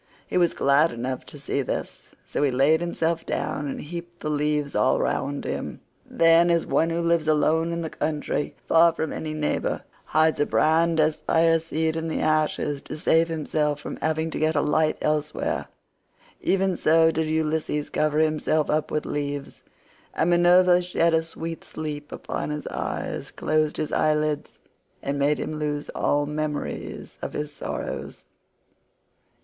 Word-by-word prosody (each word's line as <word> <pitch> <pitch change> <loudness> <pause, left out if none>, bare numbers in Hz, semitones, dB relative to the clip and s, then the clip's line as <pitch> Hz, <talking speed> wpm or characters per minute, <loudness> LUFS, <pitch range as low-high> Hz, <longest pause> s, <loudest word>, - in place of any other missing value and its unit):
He - - -6
was 175 -2 +3
glad 140 +4 +4
enough 125 +2 -4
to - - -10
see 140 0 -2
this, 130 - -5 0.2
so - - -2
he 145 - +3
laid 140 +5 +3
himself 165 -1 -1
down 145 - -2
and 135 - -4
heaped 175 +2 -8
the 150 - -2
leaves 150 -1 0
all 130 - +3
round 140 0 -1
him. - - -4 0.3
Then, 165 +1 +5
as 170 -1 +2
one 165 - +2
who 170 +1 -1
lives 170 -2 +1
alone 160 +2 +2
in 170 0 -2
the 160 - -3
country, 150 -1 -2
far 165 0 +5
from 160 -1 -3
any 155 -1 -4
neighbor, 150 -1 -1 0.2
hides 155 0 +2
a 145 - +2
brand 165 +1 +3
as 155 0 +3
fire 165 0 +3
seed 160 0 -1
in 165 0 -2
the 160 - -2
ashes 155 -2 0
to - - -7
save 165 +2 +3
himself 150 -2 -1
from - - -6
having 160 +1 -1
to - - -3
get 155 +1 +1
a 145 - +3
light 155 +1 +2
elsewhere, 150 0 -1 0.7
even 190 -1 +1
so 160 +1 +4
did 160 0 -1
Ulysses 155 -1 -1
cover 150 0 +1
himself 155 0 +1
up 155 0 0
with 150 - -2
leaves; 145 -1 -4 0.5
and 165 +2 +2
Minerva 175 +1 +5
shed 170 -1 +1
a 160 - +4
sweet 165 0 -6
sleep 150 -1 -6
upon - - -4
his 150 0 -4
eyes, - - -4
closed 155 -1 0
his 155 - -2
eyelids, 150 -1 0 0.5
and 140 +1 -2
made 145 +2 +2
him 155 - -4
lose 150 -1 -2
all 145 0 +1
memories 150 0 -4
of - - -5
his 150 0 -4
sorrows. - - -5
155 Hz, 165 wpm, -25 LUFS, 150-165 Hz, 0.7 s, Then